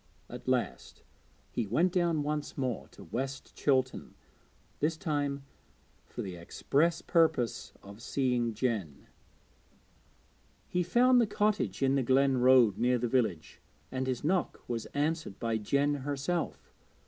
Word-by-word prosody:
At - - -9
last - - -2 0.5
he 115 -3 -2
went 165 - +2
down 170 -4 +1
once 150 0 -3
more 130 -4 -2
to - - -14
West 135 +9 -5
Chilton, 130 -2 0 0.6
this 160 +2 0
time 145 -3 -2 0.6
for - - -6
the 95 -2 -6
express 160 - 0
purpose 160 -8 +1
of 100 +3 -12
seeing 125 -3 0
Jen. 105 - -2 1.6
He 180 - 0
found 245 +8 +4
the 230 - +2
cottage 205 - 0
in 135 0 +3
the 140 - +2
glen 130 +1 +3
road 125 -5 +5
near 125 +1 +3
the 120 0 -1
village, 110 -10 -1 0.3
and 130 0 -2
his 130 -2 -2
knock 175 +3 0
was 115 -2 -3
answered 150 - -2
by 115 -2 -1
Jen 140 +7 +1
herself. 145 +4 -3
135 Hz, 135 wpm, -30 LUFS, 120-155 Hz, 1.6 s, road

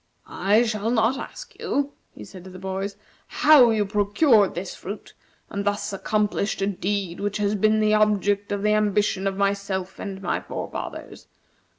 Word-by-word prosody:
"I 210 +4 +2
shall 220 -1 -1
not 235 +3 +2
ask - - -9
you," 285 0 -1 0.2
he - - -9
said 185 -3 -12
to - - -9
the 185 - -10
boys, 190 +1 -4 0.3
"how 290 -6 +6
you 215 -2 +1
procured 205 +2 +3
this 175 +2 -5
fruit, 205 +3 -8 0.3
and 200 -1 -4
thus 205 0 -1
accomplished 210 0 -1
a - - +3
deed 195 -2 -2
which 205 0 -2
has 205 0 0
been 215 +1 +2
the 215 0 +3
object 205 -1 +2
of 205 0 -2
the 210 0 +3
ambition 205 -2 +1
of 195 -1 -2
myself 200 -1 -2
and 195 -2 -5
my 195 - -1
forefathers. - - -7
205 Hz, 170 wpm, -24 LUFS, 195-215 Hz, 0.3 s, how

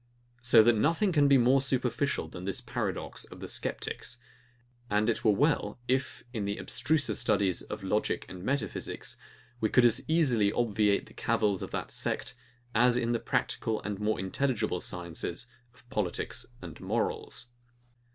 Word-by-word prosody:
So 120 -2 +7
that 120 +2 +5
nothing 165 - +2
can 145 -4 +4
be 140 -1 +6
more 130 +2 +4
superficial 130 +1 0
than 90 0 -8
this 100 - 0
paradox - - -3
of - - -12
the - - -6
sceptics; - - -2 0.7
and 105 +1 +2
it - - -4
were 110 - +4
well, 145 +9 +1
if, 130 0 -1
in 110 -4 -2
the 100 0 -2
abstruser 145 -8 0
studies 95 -3 +2
of - - -7
logic - - 0
and 90 - -9
metaphysics, 140 +6 -2 0.4
we 110 - +1
could 125 - +5
as 120 - +4
easily 125 -11 +3
obviate 105 -3 +1
the - - -16
cavils 110 -4 +1
of - - -4
that - - -4
sect, - - -1 0.4
as 120 +2 +4
in 120 -1 0
the 120 - +1
practical 110 -1 -1
and 105 -2 -4
more 105 -1 0
intelligible 105 -1 -1
sciences 85 +3 -3 0.3
of 125 0 -22
politics 105 -8 -2 0.2
and - - -9
morals. 120 - -2
115 Hz, 160 wpm, -30 LUFS, 105-130 Hz, 0.7 s, So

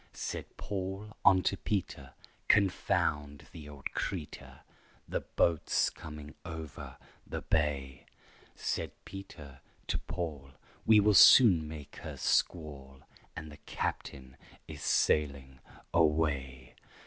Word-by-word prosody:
Said - - -6
Paul 100 +2 -5
unto 95 0 +4
Peter, 100 -2 -3 0.3
"Confound 75 -7 +1
the 75 -3 -10
old 70 -1 -7
creetur, 85 -7 -5 0.5
The - - -1
boat's 85 -3 +1
coming 75 -1 -10
over 80 -4 -8 0.3
the - - -5
bay." 70 -4 -1 0.5
Said - - -3
Peter 85 -7 -10 0.2
to - - -1
Paul, 70 -6 -6 0.3
"We 110 -1 +7
will 105 +1 +4
soon 95 -6 +8
make 75 -2 -9
her - - -8
squall, 70 -5 -1 0.3
And 80 -1 -7
the 75 - -12
captain 65 0 -4 0.3
is - - -9
sailing 70 -3 +1 0.3
away." 70 -5 +1
75 Hz, 105 wpm, -31 LUFS, 70-90 Hz, 0.5 s, soon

